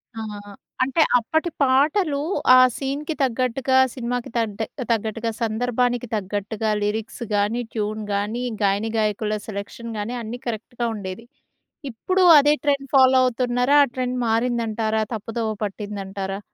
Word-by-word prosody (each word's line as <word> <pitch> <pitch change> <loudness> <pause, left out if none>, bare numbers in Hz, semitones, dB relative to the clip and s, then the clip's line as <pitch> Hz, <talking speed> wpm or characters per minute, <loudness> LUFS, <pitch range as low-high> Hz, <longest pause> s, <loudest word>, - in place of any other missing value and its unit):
ఆ! 225 - -5 0.6
అంటే, 270 +5 +1 0.2
అప్పటి 315 +9 -1
పాటలు 285 +4 +2 0.4
ఆ - - +8 0.2
సీన్‌కి 285 +3 -3
తగ్గట్టుగా, 260 +1 +1 0.2
సినిమాకి 245 -1 -3
తడ్డె 220 -1 -1 0.3
తగ్గట్టుగా, 225 +1 -1
సందర్భానికి 245 +2 0
తగ్గట్టుగా, 205 +2 -3
లిరిక్స్ 215 +3 -3
గాని 205 +4 +1
ట్యూన్ 215 0 -2
గానీ, 210 +5 -2 0.2
గాయనిగాయకుల 215 +1 0
సెలెక్షన్ 215 +3 -6
గాని, 210 +4 -3
అన్నీ 230 +2 -6
కరెక్ట్‌గా 235 +1 -3
ఉండేది. 200 +2 -7 0.7
ఇప్పుడు 370 +11 0 0.2
అదే 290 +1 +4
ట్రెండ్ 280 -2 0
ఫాలో 260 -1 +6
అవుతున్నారా? 250 +2 +1
ఆ - - -11
ట్రెండ్ 255 -1 -2
మారిందంటారా? 225 -1 0
తప్పుదోవ 225 +1 -3
పట్టిందంటారా? 195 -1 -5
230 Hz, 115 wpm, -23 LUFS, 215-255 Hz, 0.7 s, ఆ